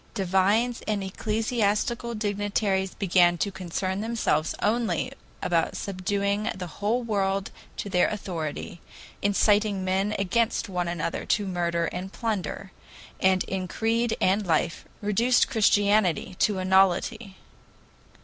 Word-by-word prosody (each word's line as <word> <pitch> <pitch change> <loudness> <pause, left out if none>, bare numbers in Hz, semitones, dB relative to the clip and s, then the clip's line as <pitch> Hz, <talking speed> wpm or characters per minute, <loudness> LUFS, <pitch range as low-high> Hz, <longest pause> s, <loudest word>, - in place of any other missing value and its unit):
Divines 200 +5 +2
and 210 -2 0
ecclesiastical 220 +3 -1
dignitaries 205 -2 -1
began 175 -3 +3
to 200 - -1
concern 190 +1 -3
themselves 220 -9 0
only 230 +1 0 0.3
about 165 -2 +1
subduing 200 +2 -1
the 185 - -5
whole 210 +8 -1
world 195 -3 -1 0.3
to - - -4
their 180 -2 +3
authority, 170 -5 -5 0.4
incited 205 +1 +3
men 190 +2 0
against 225 +5 0
one 180 -3 -2
another 170 -1 -2
to 210 - +1
murder 170 -2 -1
and 180 +3 -5
plunder, 195 -4 -3 0.5
and 190 -1 +3
in 190 -1 -3
creed 225 +3 0
and 195 +2 +2
life 165 0 0 0.2
reduced 230 +5 +3
Christianity 205 -4 +2
to 205 -2 +2
a 185 - -2
nullity. 190 +2 +2
200 Hz, 120 wpm, -26 LUFS, 185-215 Hz, 0.5 s, began